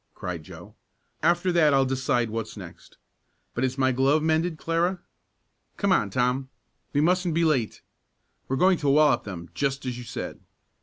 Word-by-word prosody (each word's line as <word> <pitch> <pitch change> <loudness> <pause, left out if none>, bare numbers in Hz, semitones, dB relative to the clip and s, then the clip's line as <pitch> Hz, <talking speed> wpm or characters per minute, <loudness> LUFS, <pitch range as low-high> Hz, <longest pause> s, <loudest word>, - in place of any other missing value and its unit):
cried 90 -2 -5
Joe. 75 - -12 0.5
"After 175 +2 +2
that 155 -5 +4
I'll 135 0 +4
decide 130 -3 0
what's 115 0 -5
next. - - -12 0.6
But 120 - -2
is 130 +1 -1
my 130 -1 +3
glove 135 +4 +2
mended, 160 +1 +1
Clara? 170 +3 0 0.8
Come 200 -1 +1
on, 105 - +2
Tom, 125 +5 0 0.4
we 145 - +1
mustn't 180 0 +1
be 170 0 +2
late. 130 -9 0 0.6
We're 135 - -1
going 185 +5 +3
to 145 - 0
wallop 145 -3 +4
them 85 -4 -8
just 135 -1 -2
as 125 -1 -4
you - - -7
said." 120 - -6
135 Hz, 165 wpm, -26 LUFS, 125-165 Hz, 0.8 s, that